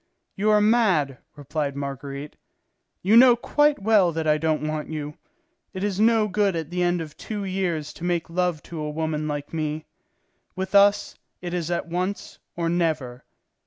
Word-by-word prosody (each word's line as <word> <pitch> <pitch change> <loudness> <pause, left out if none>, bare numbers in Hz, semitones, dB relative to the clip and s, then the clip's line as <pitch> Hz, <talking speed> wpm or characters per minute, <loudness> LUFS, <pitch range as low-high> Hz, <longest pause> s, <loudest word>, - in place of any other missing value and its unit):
"You 210 +2 +1
are 210 0 +5
mad," 195 - +2 0.2
replied 145 0 -3
Marguerite. 140 +1 -6 0.7
"You 205 +5 +4
know 245 0 +8
quite 295 +4 +2
well 205 -5 +4
that 160 0 -2
I 155 0 +3
don't 155 -1 0
want 155 0 -3
you. 150 -1 -5 0.6
It 185 - -3
is 200 -2 -1
no 220 -1 +4
good 200 -1 +1
at 160 -1 -4
the 180 0 -1
end 175 -1 +1
of 155 -2 -8
two 210 -2 -5
years 180 -5 -2
to - - -12
make 175 -2 -1
love 175 -2 -1
to 165 - -8
a 150 0 -3
woman 155 0 -2
like 145 0 -5
me. 155 -1 -3 0.7
With 190 +1 -4
us, 200 0 +4 0.3
it 175 -1 -6
is 175 -2 -2
at 175 -1 -2
once, 180 +4 -4 0.2
or 170 -1 -1
never. 155 -8 -1
170 Hz, 175 wpm, -24 LUFS, 150-195 Hz, 0.7 s, know